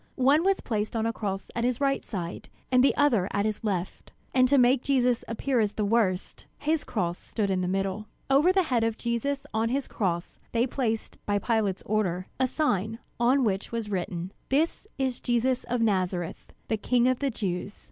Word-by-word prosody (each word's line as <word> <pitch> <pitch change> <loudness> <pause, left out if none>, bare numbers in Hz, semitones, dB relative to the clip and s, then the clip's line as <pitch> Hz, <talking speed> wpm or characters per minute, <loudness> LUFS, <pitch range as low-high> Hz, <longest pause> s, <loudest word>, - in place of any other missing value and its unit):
One 290 +5 +5
was 390 0 +2
placed 215 -1 -2
on 225 0 0
a 230 - 0
cross 195 -3 -4
at 235 - -1
his 245 0 +1
right 275 -1 +1
side, 175 -5 -5 0.2
and 250 0 +5
the 275 - +4
other 235 -11 +3
at 200 +1 0
his 215 0 -2
left; 190 -4 -3 0.2
and 255 -1 +5
to 280 +2 +4
make 250 0 +5
Jesus 250 -3 +2
appear 245 +2 0
as 210 -2 +1
the 210 - -1
worst, 200 -4 0
his 310 +1 0
cross 175 -6 -2
stood 205 -3 -2
in 185 -1 +1
the 180 - -1
middle. 195 +2 -1 0.2
Over 280 +7 +5
the 380 0 +3
head 245 -8 +1
of 225 0 0
Jesus 245 +4 -2
on 220 +1 +1
his 270 +2 -1
cross, 175 -4 -2
they 235 +1 +3
placed, 235 -4 -3
by 205 0 +2
Pilate's 205 -3 0
order, 185 -4 0
a 260 - +3
sign, 225 - 0 0.2
on 255 +3 +4
which 200 -3 -1
was 230 -3 -3
written: 180 -1 -3 0.2
"This 315 +9 +1
is 260 -2 -1
Jesus 245 +1 +1
of 245 0 -1
Nazareth, 185 -5 -1 0.2
The 220 - 0
King 245 +3 +2
of 255 -1 +2
the 280 - +1
Jews." 200 -3 -3
230 Hz, 200 wpm, -27 LUFS, 200-255 Hz, 0.2 s, One